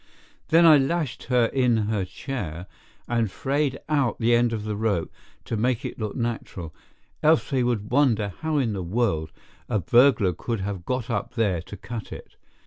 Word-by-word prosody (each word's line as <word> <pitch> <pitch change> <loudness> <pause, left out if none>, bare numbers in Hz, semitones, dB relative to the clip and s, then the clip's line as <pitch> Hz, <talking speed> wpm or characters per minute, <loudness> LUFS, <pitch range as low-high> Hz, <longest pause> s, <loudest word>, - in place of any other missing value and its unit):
Then 165 +2 +5
I 155 -3 +8
lashed 145 -1 -1
her 125 -1 +3
in 125 -1 +2
her 105 -2 0
chair, 90 - -5 0.4
and 115 -3 0
frayed 135 +5 -1
out 140 -5 +1
the 120 0 +2
end 120 0 +3
of 110 -2 -3
the 105 -1 -3
rope 100 -5 -1 0.3
to - - -3
make 120 +2 0
it - - -6
look 105 -2 -3
natural, 110 -9 -4 0.5
else 155 0 +3
they 130 -2 +2
would 115 -4 -1
wonder 115 -8 +2
how 160 -1 -1
in 120 -6 +1
the 95 - -3
world 85 -5 -1 0.4
a - - +1
burglar 120 -2 +4
could 115 +5 -3
have 95 -2 -4
got 125 -1 -2
up 105 +3 -3
there 100 -8 +1
to 100 +4 -10
cut 115 +1 -7
it. - - -10
115 Hz, 180 wpm, -25 LUFS, 100-130 Hz, 0.5 s, I